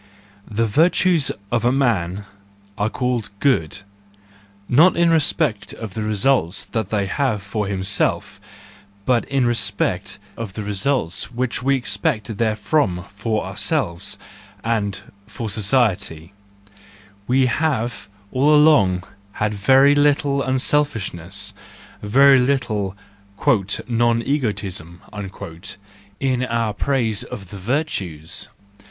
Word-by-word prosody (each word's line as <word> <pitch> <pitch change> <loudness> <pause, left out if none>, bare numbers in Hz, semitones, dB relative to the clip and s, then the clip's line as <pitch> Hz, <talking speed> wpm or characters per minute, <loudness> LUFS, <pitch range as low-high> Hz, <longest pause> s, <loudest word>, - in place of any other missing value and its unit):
— 100 0 -29
The 115 - +4
virtues 165 - +3 0.2
of 120 -1 +1
a 120 - +3
man 105 -8 0 0.5
are 105 +2 0
called 125 -2 -2
goody 100 - +1 0.9
not 160 +9 +5
in 170 -1 +4
respect 155 -7 +1
of 110 -4 -7
the 110 - -4
results 105 -2 +1
they 105 -2 -1
have 110 0 -1
for 105 0 -3
himself, 100 0 -1 0.6
but 125 -2 +2
in 135 -2 +1
respect 100 -5 -1 0.2
of 115 -4 -6
the 105 - -5
results 100 - -1
which 125 0 -2
we 135 +2 +2
expect 120 - -1
therefrom 105 - 0
for 110 +2 -2
ourselves 85 0 -1 0.5
and 105 -4 -1 0.3
for 105 +1 -5
society:—we 100 +2 -2
have 120 -7 -1 0.2
all 145 +4 +4
along 105 - +5 0.3
had 105 0 -1
very 135 +8 +5
little 145 -1 +2
unselfish¬ 130 -4 0
ness, 100 +4 -6 0.5
very 135 +6 +6
little 120 -7 0 0.2
" 100 +5 -16 0.4
non 115 -1 +2
egoism 100 - -2 0.6
" 100 +2 -13
in 130 -2 0
our 115 -3 -1
praise 115 -3 0
of 95 -4 -9
the 100 - -8
virtues 95 - -3
110 Hz, 110 wpm, -21 LUFS, 100-130 Hz, 0.9 s, very